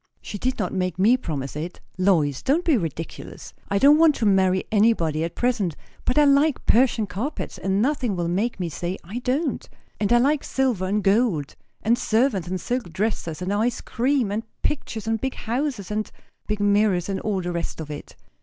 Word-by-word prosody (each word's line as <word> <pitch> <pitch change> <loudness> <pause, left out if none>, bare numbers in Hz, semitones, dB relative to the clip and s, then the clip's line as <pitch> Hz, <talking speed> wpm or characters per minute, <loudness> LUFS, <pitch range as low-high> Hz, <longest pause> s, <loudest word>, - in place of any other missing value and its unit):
"She 205 - -7
did 255 +3 -1
not - - -2
make 185 -3 -1
me 215 +7 +5
promise 145 - -4
it. 160 +4 -5 0.2
Lois, 170 -8 +2
don't 300 +6 +1
be 320 - +4
ridiculous. 165 - -5 0.2
I 200 - +1
don't 290 +7 +6
want 320 -3 +6
to 225 - -1
marry 190 -2 +3
anybody 200 -8 +2
at 165 0 -4
present; 225 - 0 0.3
but 255 - 0
I 300 - +7
like 280 +1 +3
Persian 235 -2 +3
carpets, 220 +10 -5
and 195 +2 +1
nothing 255 -6 0
will 175 -1 -1
make 205 +7 -1
me 180 - -1
say 175 +4 -4
I 200 +8 -5
don't. 270 +5 -1 0.3
And 205 0 0
I 240 - +6
like 280 +4 +2
silver 255 -8 0
and 205 +2 0
gold; 195 - +1 0.3
and 235 +2 +2
servants, 220 -6 +1
and 185 +1 -2
silk 240 -2 -3
dresses, 180 -3 -2
and 190 +2 -1
ice 225 +3 0
cream, 250 -3 0
and 210 +2 -1 0.2
pictures, 245 -7 -2
and 225 0 -1
big 265 0 -2
houses, 235 -4 -3
and 215 0 -2 0.4
big 210 0 -2
mirrors, 205 -3 +2
and 195 -1 -2
all 205 -3 -1
the 175 0 -3
rest 170 -1 -4
of 155 -2 -6
it." 145 - -8
210 Hz, 195 wpm, -24 LUFS, 180-250 Hz, 0.4 s, I